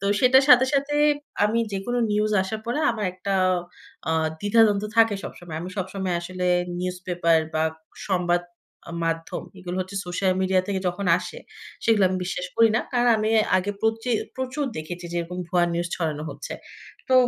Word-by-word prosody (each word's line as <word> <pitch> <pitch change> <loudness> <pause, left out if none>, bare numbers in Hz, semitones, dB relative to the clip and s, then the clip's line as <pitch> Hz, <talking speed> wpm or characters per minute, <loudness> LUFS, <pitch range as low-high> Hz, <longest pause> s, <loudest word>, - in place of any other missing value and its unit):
তো 200 - -5 0.2
সেটার 260 +2 +6
সাথে, 250 0 +8
সাথে 280 +1 +1 0.5
আমি 215 +2 +2
যেকোনো 200 +6 -2
নিউজ 210 +1 +1
আসার 215 +3 -4
পরে 240 +5 -1
আমার 215 -3 -3
একটা 185 +2 -4 0.7
অ্যা 160 - 0 0.3
দ্বিধাদ্বন্দ 205 -1 +4
থাকে 225 -2 +5
সবসময়। 170 -3 -8
আমি 180 +2 -6
সবসময় 190 -1 -2
আসলে 180 +1 -5 0.3
নিউজ 180 0 -2
পেপার 170 -2 +3 0.2
বা 155 - +2 0.5
সংবাদ 175 -2 +2 0.5
আ - - -8
মাধ্যম 165 -1 -2 0.2
এগুলো 180 0 -5
হচ্ছে 185 +2 -5
সোশ্যাল 185 +2 +1
মিডিয়া 190 0 +3
থেকে 195 -2 -1
যখন 180 +2 -4
আসে, - - -7 0.5
সেগুলো 225 -3 +4
আমি 185 - -1
বিশ্বাস 180 0 -3
করি 230 0 +6
না। - - +2
কারণ 245 0 +3
আমি 215 0 0 0.3
আগে 190 +2 0
প্রচি 225 +2 0 0.3
প্রচুর 260 +3 -2
দেখেছি 175 +3 -6
যে - - -3
এরকম 180 +2 -6
ভুয়া 175 -1 +3
নিউজ 170 0 -1
ছড়ানো 155 -3 -2
হচ্ছে। - - -7 0.6
তো 260 - +3
190 Hz, 170 wpm, -24 LUFS, 175-225 Hz, 0.7 s, সাথে